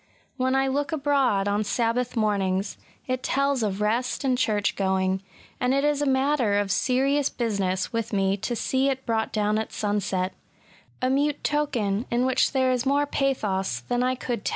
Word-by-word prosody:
When 260 0 0
I 270 0 +3
look 285 +4 -1
abroad 275 -9 +1
on 205 +1 +1
Sabbath 235 +3 -1
mornings, 200 -2 0 0.3
it 255 0 -2
tells 275 -1 +1
of 205 -2 -1
rest 235 +6 0
and 260 -2 +2
church 215 -5 0
going; 190 -1 0 0.4
and 250 +1 +1
it 275 - +1
is 295 -1 +1
a 290 - +1
matter 265 -5 +2
of 205 -1 0
serious 270 +5 +2
business 195 -5 -1
with 230 0 -2
me 195 -2 +1
to 225 +4 -3
see 265 +4 +1
it 265 -1 -3
brought 220 -1 0
down 210 0 +1
at 220 - -4
sunset, 195 -3 -1 0.4
— - - -30
a 255 - +3
mute 290 +2 0
token 240 -8 0
in 240 +1 +1
which 260 -1 +2
there 260 -2 +2
is 250 -1 0
more 280 +2 +2
pathos 205 - -1
than 245 - -1
I 255 +1 +1
could 240 -3 -4
teU. - - 0
245 Hz, 185 wpm, -25 LUFS, 205-270 Hz, 0.4 s, I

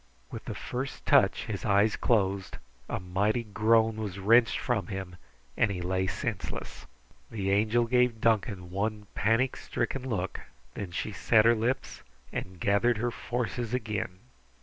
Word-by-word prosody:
With - - -7
the - - -5
first 130 +2 -5
touch - - +4
his 100 -3 -4
eyes 105 0 +3
closed, 100 -4 0 0.3
a - - -2
mighty 100 +6 0
groan 110 +1 +2
was 105 -4 -4
wrenched 115 +4 +4
from 105 -8 -1
him, 95 -3 -5 0.4
and 110 - +3
he 95 -2 -3
lay 95 +1 0
senseless. 105 +2 -4 0.4
The 100 -3 -2
Angel 110 +4 +3
gave 125 -1 +2
Duncan 100 -5 0
one 105 +2 -2
panic 115 +5 +2
stricken 130 +2 -3
look. 95 -5 -2 0.3
Then 100 - -5
she 90 +4 -3
set 110 +3 +3
her 115 - +7
lips 120 +4 -2 0.3
and 95 -1 -5
gathered 100 +5 +2
her 120 +2 -1
forces 120 0 -3
again. 105 -6 -3
110 Hz, 150 wpm, -29 LUFS, 95-115 Hz, 0.4 s, her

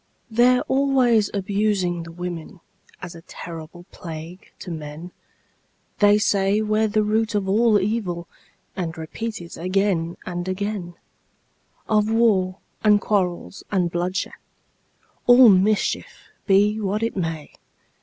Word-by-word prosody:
They're 245 +2 +4
always 260 -6 +2
abusing 195 -3 0
the 165 0 -9
women, 175 +1 -7 0.4
As 175 -1 -7
a 165 - -12
terrible 165 +1 -10
plague 165 +2 -9
to 180 - -8
men; 155 +2 -7 0.9
They 205 0 +6
say 200 0 +2
we're 215 0 +1
the 215 0 +1
root 215 +1 0
of 200 -2 0
all 215 +2 +4
evil, 190 -4 -2 0.5
And 165 -3 -4
repeat 220 +8 -5
it 170 - -10
again 185 -2 0
and 175 0 -4
again 185 -2 -3 0.9
Of 215 0 +2
war, 205 -5 +2 0.3
and 210 -1 +5
quarrels, 195 -2 -2
and 180 -4 +1
bloodshed, 180 +3 -2 0.9
All 245 0 +8
mischief, 200 +2 +1 0.2
be 205 +2 +3
what 210 +1 -1
it 230 - -1
may. 165 -5 -4
195 Hz, 125 wpm, -22 LUFS, 175-215 Hz, 0.9 s, All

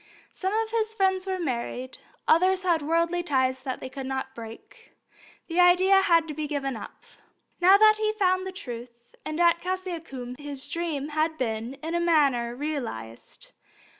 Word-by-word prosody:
Some 380 0 -3
of 440 +1 -1
his 445 -1 -1
friends 380 -2 +1
were 380 -1 -1
married; 255 -3 -4 0.3
others 370 +3 +4
had 340 -4 +2
worldly 335 +3 +1
ties 260 -5 0
that 260 -1 -4
they - - -5
could 260 0 -7
not 265 0 -4
break. 225 -1 -12 0.5
The 335 +1 -2
idea 370 +2 +6
had 335 -4 +3
to 305 - -5
be 300 0 -4
given 275 -3 -2
up. - - -10 0.6
Now 370 +3 +7 0.2
he 430 0 -1
had 430 - -1
found 370 -2 +1
the - - -4
Truth, 240 -9 -9
and 310 +1 -4
at 340 -1 +4
Cassiacum 335 -9 -5
his 290 -1 -4
dream 305 -3 -3
had 310 +1 0
been 230 0 -3
in 325 +1 -3
a 345 - +1
manner 280 -8 +2
realized. 240 - -6
315 Hz, 165 wpm, -26 LUFS, 260-370 Hz, 0.6 s, Now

